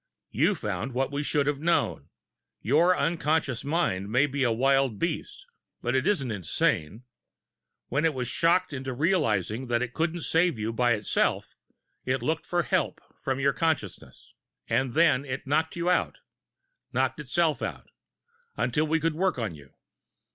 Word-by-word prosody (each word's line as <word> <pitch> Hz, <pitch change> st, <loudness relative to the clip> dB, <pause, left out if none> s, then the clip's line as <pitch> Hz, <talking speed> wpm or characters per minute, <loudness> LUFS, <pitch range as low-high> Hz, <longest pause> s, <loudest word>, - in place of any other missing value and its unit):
You -, -, +2 dB
found 130 Hz, +3 st, -4 dB
what 135 Hz, +1 st, 0 dB
we 145 Hz, +1 st, -2 dB
should 145 Hz, -1 st, 0 dB
have 145 Hz, -1 st, 0 dB
known 110 Hz, -, 0 dB, 0.5 s
your 165 Hz, +10 st, +3 dB
unconscious 155 Hz, -6 st, 0 dB
mind 140 Hz, -, 0 dB
may 125 Hz, +6 st, +3 dB
be 140 Hz, 0 st, -3 dB
a 120 Hz, -, +3 dB
wild 135 Hz, 0 st, +2 dB
beast, -, -, -3 dB, 0.3 s
but 120 Hz, +2 st, -1 dB
it 130 Hz, -, +1 dB
isn't 140 Hz, -, +1 dB
insane. 95 Hz, +1 st, -1 dB, 0.9 s
When 140 Hz, +5 st, 0 dB
it 160 Hz, -3 st, +2 dB
was 125 Hz, -1 st, -2 dB
shocked 170 Hz, +5 st, +2 dB
into 130 Hz, -1 st, -4 dB
realizing 130 Hz, -, 0 dB
that 120 Hz, 0 st, +1 dB
it 125 Hz, -1 st, -5 dB
couldn't 165 Hz, +1 st, -1 dB
save 165 Hz, -2 st, +2 dB
you 110 Hz, +1 st, -2 dB
by 120 Hz, +1 st, +3 dB
itself, 105 Hz, -2 st, 0 dB, 0.5 s
it 130 Hz, -1 st, -1 dB
looked 160 Hz, +5 st, -1 dB
for 175 Hz, -1 st, +1 dB
help -, -, 0 dB, 0.2 s
from 135 Hz, 0 st, -1 dB
your 140 Hz, 0 st, +2 dB
consciousness. 155 Hz, -, -3 dB, 0.3 s
And 130 Hz, -2 st, 0 dB
then 150 Hz, -4 st, +4 dB
it 135 Hz, -1 st, -5 dB
knocked 155 Hz, +3 st, 0 dB
you 170 Hz, 0 st, -2 dB
out 180 Hz, -, +2 dB, 0.8 s
knocked -, -, 0 dB
itself -, -, 0 dB
out -, -, -5 dB, 0.7 s
until 150 Hz, +6 st, +1 dB
we 160 Hz, +1 st, +2 dB
could 165 Hz, 0 st, 0 dB
work 185 Hz, +1 st, 0 dB
on 110 Hz, -7 st, -2 dB
you." 70 Hz, -3 st, -14 dB
135 Hz, 160 wpm, -27 LUFS, 120-160 Hz, 0.9 s, then